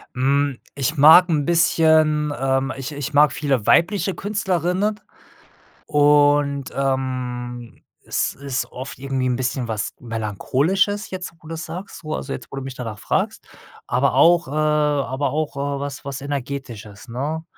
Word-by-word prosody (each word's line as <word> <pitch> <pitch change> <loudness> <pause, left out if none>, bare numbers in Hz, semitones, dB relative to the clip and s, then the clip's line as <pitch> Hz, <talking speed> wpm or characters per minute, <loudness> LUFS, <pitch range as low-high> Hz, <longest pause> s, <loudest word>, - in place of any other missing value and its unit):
Hm, 140 +1 +1 0.2
ich 140 +3 -1
mag 160 +5 +8
'n 150 -4 +1
bisschen, 160 -3 +3
ähm 135 0 0
ich 135 0 -6
ich 145 0 -5
mag 145 +1 +5
viele 135 -7 -1
weibliche 190 +1 +3
Künstlerinnen. 195 +1 -1 0.9
Und, 145 -1 +3
ähm, 125 -3 -3 0.2
es - - -1
ist 140 -1 -3
oft 130 0 -8
irgendwie 135 -1 -2
'n 125 - +1
bisschen 125 -1 -2
was 110 -2 -3
Melancholisches 135 - -1
jetzt, 185 -1 -6
wo 160 - -14
du's 165 0 -5
sagst, 175 +1 -8
wo 155 0 -3
also, 135 - -4
jetzt - - -6
wo - - -6
du 135 - -4
mich 135 -1 -7
danach 115 -4 -6
fragst. - - -2 0.4
Aber 130 +3 +1
auch, 170 -1 +5
äh - - -9
aber 150 -3 +1
auch, 155 -1 -2
äh, 140 0 -2
was 140 0 -6
was 140 -1 -5
Energetisches, 130 -6 -6
ne? 150 +7 -3
140 Hz, 150 wpm, -21 LUFS, 130-155 Hz, 0.9 s, mag